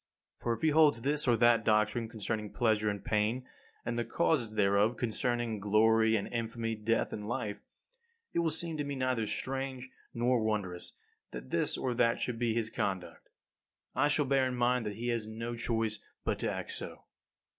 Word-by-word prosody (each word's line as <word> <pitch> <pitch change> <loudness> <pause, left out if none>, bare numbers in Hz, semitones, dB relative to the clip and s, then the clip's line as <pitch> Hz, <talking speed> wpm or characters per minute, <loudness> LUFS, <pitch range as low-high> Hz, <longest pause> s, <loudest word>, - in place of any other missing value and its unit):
For 120 - -1
if 115 - -6
he 160 - +5
holds 150 -6 +4
this 145 +1 +1
or 120 -2 +4
that 120 -1 +5
doctrine 110 +1 +2
concerning 110 -1 -3
pleasure 110 -3 +2
and 100 -1 -4
pain, 110 +4 0 0.4
and 120 0 -1
the - - +1
causes 120 -2 0
thereof, 105 +3 +3
concerning 120 -1 -1
glory 110 +2 +4
and 100 - -1
infamy, 115 -1 -2
death 110 +1 0
and 105 -1 -5
life, 110 -4 -3 0.7
it - - +1
will 170 -1 +2
seem 160 +1 -1
to 145 - -1
me 140 0 -4
neither 130 -4 0
strange 130 +1 -3 0.2
nor 120 0 +1
wondrous 100 -5 -2 0.3
that 60 +1 -8
this - - +1
or 125 - -1
that 115 -1 +2
should 120 -2 -2
be 115 -2 +1
his 115 -2 -1
conduct. 95 -2 -3 0.6
I 145 - +3
shall 150 0 +2
bear 135 -1 +3
in 125 - -3
mind 120 -1 +1
that 105 - -4
he 120 +3 -3
has 115 -2 -1
no 115 +2 -4
choice 115 -2 -1 0.3
but - - 0
to - - -1
act - - -4
so. - - -7
115 Hz, 185 wpm, -32 LUFS, 110-125 Hz, 0.7 s, he